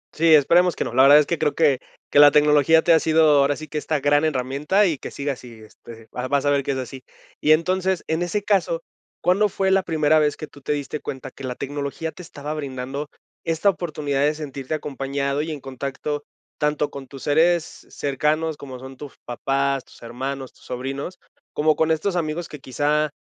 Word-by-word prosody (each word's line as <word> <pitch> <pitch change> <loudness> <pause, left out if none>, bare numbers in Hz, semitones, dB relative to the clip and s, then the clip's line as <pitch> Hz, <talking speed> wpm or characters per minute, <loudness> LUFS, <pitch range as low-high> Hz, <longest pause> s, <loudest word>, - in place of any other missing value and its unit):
Sí, 160 0 +6
esperemos 170 +5 +4
que - - -1
no. - - -5
La 130 - +5
verdad 140 +2 +8
es 150 - +5
que 170 +1 -2
creo 150 - 0
que 145 -6 +3 0.3
que - - +5
la 145 0 +10
tecnología 150 +2 +4
te 170 - +5
ha 160 - +6
sido, 160 0 +3
ahora 140 +1 +2
sí 155 - -9
que 155 - -3
esta 150 0 -1
gran 145 +1 +3
herramienta 150 +7 +1
y 160 -7 0
que - - -7
siga 140 0 -3
así, 120 -3 -13
este, 110 +1 -14
vas 125 +1 -4
vas 140 0 +1
a 145 - +3
ver 140 -1 +2
que 140 - -2
es - - -3
así. 130 0 -7 0.4
Y 155 - +5
entonces, 185 +2 0
en 160 +2 -1
ese 195 +4 -1
caso, 175 -5 +1 0.4
¿cuándo 200 +4 +2
fue 190 +1 0
la 195 0 +4
primera 155 -2 +2
vez 150 -1 +1
que 155 - -6
tú 145 -1 -17
te 150 - -1
diste 145 +1 -4
cuenta 135 0 -7
que 135 - -12
la 125 -1 -4
tecnología 145 +4 -4
te - - -12
estaba 150 -3 -7
brindando 140 0 -5 0.3
esta 165 +4 +2
oportunidad 150 -6 -3
de 150 +2 +2
sentirte 140 -1 -5
acompañado 140 -1 -2
y 160 - -4
en 150 - -5
contacto 140 +2 -5 0.4
tanto 150 0 0
con 135 -1 -8
tus 135 0 -11
seres 165 +3 +1
cercanos, 150 +3 -1
como 130 -3 -9
son 130 +1 -10
tus 145 -1 -10
papás, 135 +2 -1
tus - - -19
hermanos, 130 +3 -5
tus - - -23
sobrinos, 135 +8 -5 0.4
como 155 +1 +2
con 160 - +1
estos 160 +4 0
amigos 165 0 -2
que 150 - -10
quizá 145 +4 0
145 Hz, 210 wpm, -22 LUFS, 135-160 Hz, 0.4 s, la